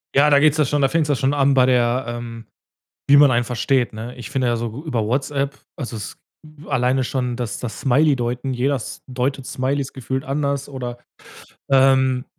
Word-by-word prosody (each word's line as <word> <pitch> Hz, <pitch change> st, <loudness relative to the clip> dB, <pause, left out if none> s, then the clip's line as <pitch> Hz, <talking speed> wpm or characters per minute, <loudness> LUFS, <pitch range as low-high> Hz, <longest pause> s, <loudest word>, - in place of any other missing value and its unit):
Ja, 145 Hz, +2 st, +5 dB
da 140 Hz, -, +6 dB
geht's 155 Hz, +1 st, +4 dB
ja 150 Hz, -, +3 dB
schon 145 Hz, +2 st, 0 dB
da 135 Hz, -, +4 dB
fängt's 160 Hz, -1 st, 0 dB
ja 145 Hz, -, +3 dB
schon 135 Hz, +2 st, 0 dB
an 140 Hz, -1 st, +3 dB
bei 130 Hz, -2 st, +5 dB
der, 125 Hz, 0 st, +2 dB
ähm, 120 Hz, -1 st, -7 dB, 0.6 s
wie 145 Hz, -, +8 dB
man 145 Hz, -2 st, +7 dB
einen 120 Hz, 0 st, +1 dB
versteht, 125 Hz, 0 st, 0 dB
ne? 115 Hz, +3 st, -7 dB
Ich 120 Hz, -, -8 dB
finde 130 Hz, -3 st, 0 dB
ja 120 Hz, -1 st, +1 dB
so 120 Hz, +5 st, -5 dB
über 120 Hz, -8 st, -1 dB
WhatsApp 140 Hz, +3 st, -1 dB, 0.2 s
also 120 Hz, -4 st, -5 dB
es 105 Hz, -, -7 dB, 0.5 s
alleine 130 Hz, +1 st, +1 dB
schon 125 Hz, -1 st, -2 dB
das 120 Hz, -4 st, -4 dB
das 115 Hz, -4 st, -6 dB
Smiley 145 Hz, +2 st, +3 dB
deuten, 125 Hz, +2 st, -2 dB
jeder 130 Hz, +3 st, 0 dB
S 115 Hz, -, -7 dB
deutet 130 Hz, +1 st, -2 dB
Smileys 135 Hz, +1 st, -2 dB
gefühlt 130 Hz, +1 st, -4 dB
anders 140 Hz, 0 st, -2 dB
oder, 125 Hz, -3 st, -6 dB, 0.7 s
ähm, 130 Hz, -1 st, +4 dB
130 Hz, 195 wpm, -21 LUFS, 120-140 Hz, 0.7 s, wie